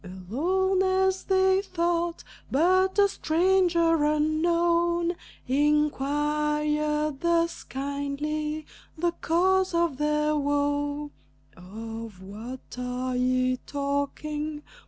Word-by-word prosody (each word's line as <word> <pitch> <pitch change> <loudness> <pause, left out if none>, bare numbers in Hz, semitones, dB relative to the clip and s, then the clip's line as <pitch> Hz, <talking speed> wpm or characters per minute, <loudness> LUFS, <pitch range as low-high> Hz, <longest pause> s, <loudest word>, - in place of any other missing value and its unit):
Alone, 315 - 0
as 380 0 +1
they 380 0 +3
thought; 340 -2 -1 0.3
but 370 +6 +3
a 405 0 +6
stranger 340 -2 +2
unknown 335 +3 +2 0.3
Inquired 300 +1 +1
thus 335 0 +1
kindly 290 +3 -3 0.3
the 345 +2 +1
cause 370 +2 +1
of 335 -5 +1
their 300 +1 +1
woe: 290 0 -1 0.4
"Of 220 +2 -8
what 225 +7 -9
are 250 +1 -3
ye 255 0 +1
talking? 295 +2 -3
300 Hz, 85 wpm, -26 LUFS, 280-340 Hz, 0.4 s, a